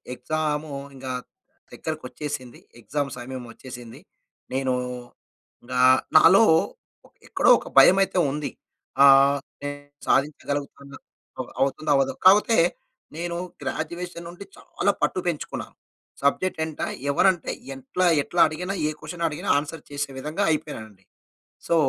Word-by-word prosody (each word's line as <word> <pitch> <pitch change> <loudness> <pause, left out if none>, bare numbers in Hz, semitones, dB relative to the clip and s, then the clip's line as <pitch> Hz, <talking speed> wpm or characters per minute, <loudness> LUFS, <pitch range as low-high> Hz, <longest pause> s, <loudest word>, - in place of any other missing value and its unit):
Exam 150 +2 -2 0.2
ఇంగ 130 - -11 0.7
దగ్గరకకొచ్చేసింది. 145 -4 -6 0.2
Exam 145 +4 -2
సమయం 125 0 -7
వచ్చేసింది. 120 -3 -11 0.5
నేను 130 -1 0 1.1
ఆహ్, 130 +1 +6 0.2
నాలో 195 +7 +7 0.8
ఎక్కడో - - +2
ఒక - - -11
భయమయితే 190 0 +6
ఉంది. 150 0 -4 0.5
ఆ! - - +9 1.0
సాధించగలుగుతానా, 140 0 -1 0.6
అవుతుందో 140 +3 0
అవ్వదో, 135 -1 +2
కాకపోతే 210 +4 +6 0.6
నేను 170 +1 -3 0.2
గ్రాడ్యుయేషన్ 175 -1 -5
నుంటి 180 +3 -10
చాలా 200 - -1
పట్టు 150 +5 +1
పెంచుకున్నాను. 165 -4 -4 0.5
సబ్జెక్ట్ 160 +6 +1
ఏంట 160 -2 -8 0.3
ఎవరు 190 - +3
అంటే 175 -4 -5 0.2
ఎట్లా, 135 +8 -2 0.2
ఎట్లా 175 - 0
అడిగిన 175 +5 -5 0.2
ఏ - - 0
క్వషన్ 170 -1 -4
అడిగిన 150 - -6
ఆన్సర్ 150 +3 -4
చేసే 145 0 -3
విధంగా 155 +8 -2
అయిపోయినానండి. 110 -10 -5 0.6
సో 170 - +2
150 Hz, 105 wpm, -24 LUFS, 135-170 Hz, 1.1 s, ఆ